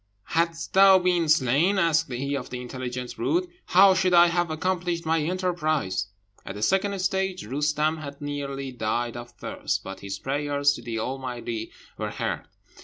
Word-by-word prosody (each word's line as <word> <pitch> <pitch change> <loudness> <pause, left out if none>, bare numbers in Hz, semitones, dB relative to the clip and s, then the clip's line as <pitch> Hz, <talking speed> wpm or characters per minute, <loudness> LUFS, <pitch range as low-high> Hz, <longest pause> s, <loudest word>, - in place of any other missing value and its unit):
"Hadst 165 0 -1
thou 195 0 +8
been 180 -3 +1
slain," 155 +6 +3
asked 165 -5 +2
he 135 +3 -2
of 130 -3 -5
the 125 - -5
intelligent 125 0 -5
brute, 360 +2 0 0.2
"how 190 +2 +7
should 185 -1 +2
I 175 0 +7
have 175 0 0
accomplished 175 +1 -1
my 160 +1 +2
enterprise?" 155 - -1 0.4
At 95 - -7
the 105 - -4
second 195 - +1
stage 190 0 -1
Roostem 150 +5 0
had 140 -2 -8
nearly 140 -2 -4
died 120 0 -2
of 120 0 -7
thirst, 120 - -4
but 95 - -7
his 100 -1 -5
prayers 145 +3 +1
to 120 - -8
the 115 -1 -4
Almighty 120 -2 -4 0.3
were - - -2
heard. - - -3
150 Hz, 165 wpm, -26 LUFS, 125-175 Hz, 0.4 s, thou